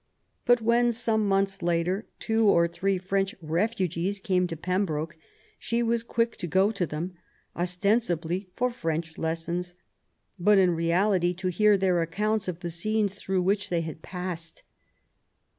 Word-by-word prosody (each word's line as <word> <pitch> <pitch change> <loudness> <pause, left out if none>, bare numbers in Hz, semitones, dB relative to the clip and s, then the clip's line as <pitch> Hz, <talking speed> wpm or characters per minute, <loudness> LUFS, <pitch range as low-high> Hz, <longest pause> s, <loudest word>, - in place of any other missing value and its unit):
But 245 -1 +4
when, 235 +1 +3
some 220 -2 +1
months 195 0 +1
later 170 +2 +1
on, 215 - -8
two 220 -1 +1
or 170 -3 +4
three 190 +3 -1
French 195 +1 -1
refugees 185 +2 -1
came 185 -2 +1
to 165 -2 -5
Pembroke, 165 -3 -1 0.4
she 235 +1 0
was 230 0 +1
quick 230 0 -1
to 175 - -4
go 190 +5 +3
to 190 -5 -1
them, 160 +5 -4 0.4
ostensibly 180 -1 0
for 250 0 +1
French 165 -7 -3
lessons, 170 +2 -2 0.6
but 205 +3 +5
in 185 -2 +5
reality 175 +2 +2
to 185 +1 -2
hear 210 +3 +4
their 185 -2 +2
accounts 210 +6 -1
of 180 -1 -4
the 170 -2 -4
scenes 205 +4 0
through 190 -2 -1
which 200 +2 0
they 170 -2 +1
had 160 -1 -6
passed. 175 -3 -6
185 Hz, 155 wpm, -27 LUFS, 170-210 Hz, 0.6 s, but